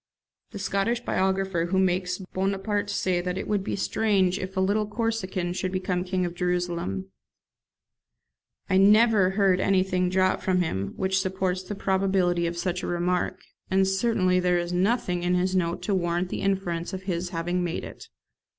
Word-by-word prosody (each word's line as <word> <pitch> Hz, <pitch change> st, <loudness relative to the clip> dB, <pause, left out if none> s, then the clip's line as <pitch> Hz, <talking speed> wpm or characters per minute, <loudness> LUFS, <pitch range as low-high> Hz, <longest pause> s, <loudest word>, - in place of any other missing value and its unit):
[The 210 Hz, -, -8 dB
Scottish 200 Hz, +4 st, 0 dB
biographer 190 Hz, -4 st, 0 dB
makes 185 Hz, -1 st, +1 dB, 0.2 s
Bonaparte 195 Hz, +2 st, -1 dB
say 180 Hz, -3 st, 0 dB
that 180 Hz, +1 st, -3 dB
it -, -, -4 dB
would 205 Hz, -2 st, 0 dB
be -, -, -2 dB
strange 195 Hz, -3 st, +1 dB
if 190 Hz, +1 st, -6 dB
a -, -, +3 dB
little 205 Hz, +3 st, +1 dB
Corsican 210 Hz, -5 st, -2 dB
should 185 Hz, 0 st, -2 dB
become 185 Hz, -1 st, -1 dB
King 185 Hz, 0 st, -1 dB
of 175 Hz, -, -4 dB
Jerusalem. 175 Hz, -, -2 dB, 1.6 s
I 185 Hz, -, +2 dB
never 210 Hz, 0 st, +5 dB
heard 195 Hz, -3 st, +4 dB
anything 185 Hz, -2 st, +2 dB
drop 185 Hz, 0 st, +2 dB
from 185 Hz, -1 st, +1 dB
him 100 Hz, -, -3 dB
which 190 Hz, 0 st, +1 dB
supports 190 Hz, -1 st, -1 dB
the 195 Hz, +3 st, -6 dB
probability 190 Hz, -3 st, +1 dB
of 170 Hz, 0 st, -4 dB
such 180 Hz, +1 st, -2 dB
a -, -, -4 dB
remark, 175 Hz, +1 st, -1 dB, 0.3 s
and 190 Hz, 0 st, +3 dB
certainly 195 Hz, -2 st, +2 dB
there 180 Hz, -1 st, +2 dB
is 175 Hz, 0 st, -2 dB
nothing 180 Hz, -1 st, +1 dB
in 180 Hz, +1 st, +1 dB
his 185 Hz, +1 st, +1 dB
note 170 Hz, -2 st, 0 dB
to 205 Hz, -, 0 dB
warrant 175 Hz, 0 st, 0 dB
the -, -, -4 dB
inference 190 Hz, -4 st, -1 dB
of 190 Hz, 0 st, -5 dB
his 180 Hz, -2 st, -2 dB
having 175 Hz, +1 st, -1 dB
made 175 Hz, -, -3 dB
it. -, -, -10 dB
185 Hz, 170 wpm, -26 LUFS, 180-195 Hz, 1.6 s, never